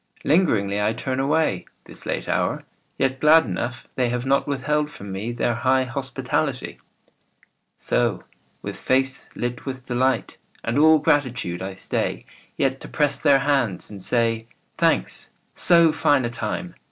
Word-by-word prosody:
Lingeringly 110 Hz, -, +2 dB
I 105 Hz, +2 st, +1 dB
turn 130 Hz, +3 st, -3 dB
away, 135 Hz, -, +1 dB, 0.2 s
This -, -, -4 dB
late -, -, -3 dB
hour, -, -, -1 dB, 0.3 s
yet 130 Hz, 0 st, 0 dB
glad 155 Hz, +1 st, +6 dB
enough 120 Hz, +5 st, -4 dB
They 125 Hz, -2 st, 0 dB
have 125 Hz, +1 st, -2 dB
not 135 Hz, +1 st, +1 dB
withheld 150 Hz, +2 st, -1 dB
from 100 Hz, -8 st, -9 dB
me 100 Hz, +5 st, -4 dB
Their 120 Hz, 0 st, 0 dB
high 130 Hz, +2 st, +2 dB
hospitality. 130 Hz, +1 st, -3 dB, 1.0 s
So, -, -, 0 dB, 0.4 s
with -, -, -5 dB
face 130 Hz, 0 st, +1 dB
lit 120 Hz, +2 st, -4 dB
with 130 Hz, -1 st, -6 dB
delight 130 Hz, -1 st, 0 dB, 0.3 s
And 115 Hz, +4 st, 0 dB
all 160 Hz, +1 st, +7 dB
gratitude, 125 Hz, -, 0 dB
I 95 Hz, 0 st, -5 dB
stay 95 Hz, -, -2 dB, 0.3 s
Yet 135 Hz, -1 st, 0 dB
to -, -, -9 dB
press 145 Hz, -2 st, +1 dB
their 140 Hz, -1 st, +5 dB
hands 130 Hz, -12 st, 0 dB
and 100 Hz, -2 st, -7 dB
say, 115 Hz, +1 st, +1 dB, 0.3 s
"Thanks. 60 Hz, -, +1 dB, 0.2 s
So 170 Hz, -2 st, +6 dB
fine 145 Hz, -4 st, +2 dB
a 120 Hz, -, -3 dB
time 120 Hz, +10 st, -4 dB
130 Hz, 150 wpm, -23 LUFS, 115-145 Hz, 1.0 s, all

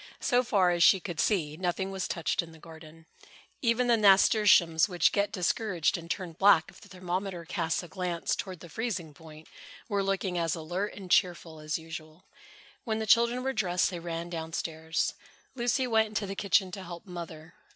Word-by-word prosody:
So 250 Hz, 0 st, +2 dB
far 195 Hz, -7 st, +2 dB
as 175 Hz, -1 st, -1 dB
she 190 Hz, +2 st, +6 dB
could 170 Hz, -2 st, -6 dB
see, 160 Hz, -8 st, +1 dB
nothing 190 Hz, +2 st, -2 dB
was 190 Hz, -1 st, -3 dB
touched 170 Hz, -, -1 dB
in 170 Hz, -1 st, -11 dB
the -, -, -14 dB
garden. 160 Hz, 0 st, -14 dB, 0.6 s
Even 240 Hz, -1 st, +2 dB
the 240 Hz, -1 st, +4 dB
nasturtiums, 195 Hz, -4 st, +5 dB
which 180 Hz, -2 st, +3 dB
get 200 Hz, 0 st, 0 dB
discouraged 180 Hz, -2 st, 0 dB
and 170 Hz, -1 st, -7 dB
turn 180 Hz, -2 st, -3 dB
black 175 Hz, -1 st, +4 dB
if -, -, -18 dB
the -, -, -15 dB
thermometer 180 Hz, -1 st, -4 dB
casts 165 Hz, 0 st, -2 dB
a -, -, -9 dB
glance 175 Hz, 0 st, -2 dB
toward 185 Hz, -3 st, -6 dB
the 175 Hz, -, -10 dB
freezing 185 Hz, -4 st, -4 dB
point, 155 Hz, 0 st, -14 dB, 0.4 s
were 200 Hz, -4 st, 0 dB
looking 195 Hz, -2 st, -1 dB
as 165 Hz, -2 st, 0 dB
alert 175 Hz, +5 st, -4 dB
and 190 Hz, -3 st, -9 dB
cheerful 170 Hz, -3 st, +1 dB
as 155 Hz, 0 st, -2 dB
usual. 160 Hz, 0 st, -10 dB, 0.6 s
When 220 Hz, -2 st, -2 dB
the 220 Hz, -, -2 dB
children 235 Hz, +3 st, +3 dB
were 265 Hz, 0 st, -1 dB
dressed, 180 Hz, -5 st, +1 dB
they 175 Hz, -, -5 dB
ran 170 Hz, 0 st, -5 dB
down 165 Hz, -1 st, -5 dB
stairs. 160 Hz, 0 st, -2 dB, 0.4 s
Lucy 255 Hz, +1 st, 0 dB
went 220 Hz, -2 st, +2 dB
into 215 Hz, -1 st, -3 dB
the 195 Hz, -, -5 dB
kitchen 195 Hz, -1 st, +1 dB
to 195 Hz, -, -7 dB
help 175 Hz, 0 st, -9 dB
Mother. 170 Hz, -3 st, -9 dB
180 Hz, 190 wpm, -29 LUFS, 165-200 Hz, 0.6 s, she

